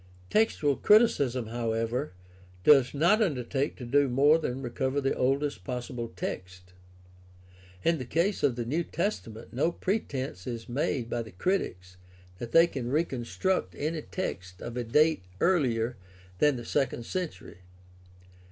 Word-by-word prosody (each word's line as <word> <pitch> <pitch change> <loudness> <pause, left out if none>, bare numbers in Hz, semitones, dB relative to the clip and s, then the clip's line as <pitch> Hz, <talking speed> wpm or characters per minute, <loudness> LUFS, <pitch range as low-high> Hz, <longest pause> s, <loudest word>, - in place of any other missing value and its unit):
Textual 155 -10 +2
criticism, 140 - +4
however, 115 +2 -2 0.5
does 135 0 +6
not 175 +10 +4
undertake 140 - 0
to 125 - -8
do 140 +3 +3
more 145 +6 +5
than 135 -3 -3
recover 130 +3 -1
the 135 -1 +1
oldest 140 +3 0
possible 125 -2 -5
text. 90 0 -6 1.1
In 165 -2 +2
the 130 - -4
case 170 - 0
of 135 -4 +2
the 120 -1 -3
New 155 +8 0
Testament 120 - -4
no 145 +7 +1
pretense 135 - -3
is 115 -2 -5
made 125 -1 -1
by 120 0 -2
the 110 -2 -9
critics 90 - -2 0.4
that 120 -1 -6
they 165 +5 +7
can 130 -8 -4
reconstruct 155 +5 -1
any 155 +2 -2
text 90 - -5
of 120 - -6
a 125 - -1
date 150 +6 +3 0.2
earher 125 -10 +1 0.4
than 150 +2 +4
the 120 -1 -6
second 125 -3 -1
century. 180 - -5
130 Hz, 140 wpm, -28 LUFS, 120-155 Hz, 1.1 s, they